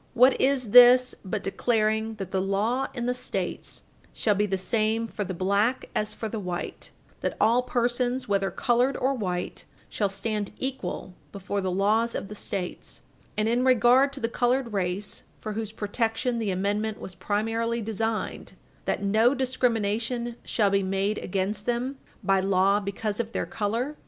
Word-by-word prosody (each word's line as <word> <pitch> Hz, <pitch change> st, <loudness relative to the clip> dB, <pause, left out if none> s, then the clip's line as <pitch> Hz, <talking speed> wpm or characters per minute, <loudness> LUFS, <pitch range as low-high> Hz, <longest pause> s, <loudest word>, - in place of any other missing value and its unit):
What 255 Hz, +2 st, +5 dB
is 260 Hz, -5 st, +1 dB
this 250 Hz, +1 st, +8 dB
but 200 Hz, +1 st, -3 dB
declaring 220 Hz, +1 st, 0 dB
that 195 Hz, -3 st, -6 dB
the 190 Hz, -, +1 dB
law 210 Hz, +7 st, 0 dB
in 240 Hz, -2 st, -2 dB
the 250 Hz, -, +1 dB
States 250 Hz, 0 st, -4 dB, 0.3 s
shall 215 Hz, -, +2 dB
be 205 Hz, +1 st, +1 dB
the 190 Hz, -1 st, 0 dB
same 220 Hz, +3 st, 0 dB
for 210 Hz, -, -4 dB
the 185 Hz, -1 st, -5 dB
black 200 Hz, +7 st, +1 dB
as 215 Hz, 0 st, -1 dB
for 220 Hz, -, -4 dB
the 220 Hz, 0 st, -4 dB
white; 180 Hz, -3 st, -5 dB, 0.3 s
that -, -, -2 dB
all 235 Hz, +3 st, +4 dB
persons, 245 Hz, +1 st, 0 dB
whether 195 Hz, -1 st, +1 dB
colored 250 Hz, +2 st, +1 dB
or 265 Hz, +2 st, +1 dB
white, 180 Hz, -7 st, -3 dB, 0.2 s
shall 205 Hz, -2 st, 0 dB
stand 205 Hz, +1 st, -3 dB
equal 265 Hz, -7 st, -4 dB, 0.2 s
before 200 Hz, 0 st, -3 dB
the 190 Hz, -, -1 dB
laws 215 Hz, +5 st, +2 dB
of 195 Hz, -, -4 dB
the -, -, -6 dB
States, 195 Hz, -3 st, -5 dB, 0.4 s
and, 215 Hz, 0 st, +1 dB
in 240 Hz, +2 st, +2 dB
regard 255 Hz, +2 st, +5 dB
to 275 Hz, -, -5 dB
the 230 Hz, -, 0 dB
colored 245 Hz, 0 st, 0 dB
race, 190 Hz, +1 st, -2 dB, 0.2 s
for 215 Hz, -, -5 dB
whose 220 Hz, 0 st, -3 dB
protection 225 Hz, +3 st, -1 dB
the 220 Hz, -3 st, -1 dB
amendment 205 Hz, +3 st, -1 dB
was 190 Hz, -, -7 dB
primarily 225 Hz, +4 st, -1 dB
designed, 225 Hz, 0 st, -3 dB, 0.3 s
that -, -, -1 dB
no 220 Hz, +6 st, +4 dB
discrimination 240 Hz, -2 st, 0 dB
shall 205 Hz, -3 st, +1 dB
be 200 Hz, 0 st, +3 dB
made 195 Hz, +2 st, 0 dB
against 195 Hz, +2 st, -2 dB
them 245 Hz, +3 st, -1 dB, 0.3 s
bar 195 Hz, -1 st, +3 dB
law 195 Hz, +1 st, +3 dB
because 205 Hz, +1 st, -3 dB
of 230 Hz, 0 st, -3 dB
their -, -, -1 dB
color? 230 Hz, +8 st, -2 dB
220 Hz, 165 wpm, -26 LUFS, 200-240 Hz, 0.4 s, this